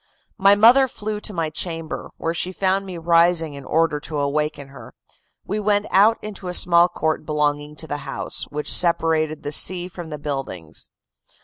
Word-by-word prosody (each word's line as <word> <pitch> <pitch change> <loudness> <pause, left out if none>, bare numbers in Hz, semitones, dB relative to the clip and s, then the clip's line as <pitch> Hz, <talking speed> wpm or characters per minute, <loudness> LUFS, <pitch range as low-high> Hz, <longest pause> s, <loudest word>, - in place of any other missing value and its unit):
My 195 +1 +6
mother 240 +6 +6
flew 215 -3 -5
to 210 - -5
my 165 -5 -3
chamber, 165 0 -4
where 165 - -2
she 180 +2 -1
found 195 +1 -1
me 180 -2 -7
rising 165 -1 +3
in 140 -1 -9
order 160 -1 0
to 150 +1 -6
awaken 145 0 -2
her. 135 - -13 0.5
We 210 +2 -3
went 205 0 +1
out 210 +4 +5
into 200 -3 -7
a 180 - 0
small 170 0 +5
court 160 -3 -2
belonging 150 -1 -1
to 160 - -7
the 145 - -3
house, - - -4
which 150 0 -1
separated 160 -3 +1
the 145 - -4
sea 180 +3 +2
from 175 -2 -9
the 150 - -6
buildings. 135 - -6
165 Hz, 180 wpm, -21 LUFS, 150-190 Hz, 0.5 s, My